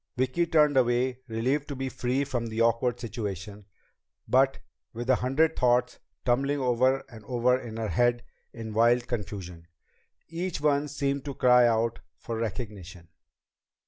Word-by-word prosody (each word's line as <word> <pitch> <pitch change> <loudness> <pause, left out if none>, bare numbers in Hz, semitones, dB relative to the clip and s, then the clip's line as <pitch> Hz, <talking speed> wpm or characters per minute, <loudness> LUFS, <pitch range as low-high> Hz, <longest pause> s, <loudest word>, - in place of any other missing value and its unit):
Vicki 130 +7 +1
turned 150 -3 +4
away, 125 0 +2
relieved 130 +6 -1
to 140 - -5
be 135 0 -3
free 130 +1 -1
of 120 -4 -3
the 110 +1 -4
awkward 115 +1 +2
situation, 105 -3 -6 0.6
but 135 +1 +3 0.4
with 120 +1 -5
a 130 - +4
hundred 155 +6 +1
thoughts 125 0 +2 0.3
tumbling 135 +4 +1
over 130 +1 +2
and 110 -3 -13
over 125 +1 +2
in 120 -3 -6
her 110 -2 -2
head 120 0 +2 0.3
in 110 -2 -7
wild 120 +2 +3
confusion, 95 -7 -6 0.6
each 170 +1 -4
one 145 0 +1
seeming 140 -1 -2
to 140 0 -6
cry 125 -1 +5
out 115 0 0 0.2
for 115 - -6
recognition. 100 -6 -6
125 Hz, 145 wpm, -27 LUFS, 115-135 Hz, 0.6 s, cry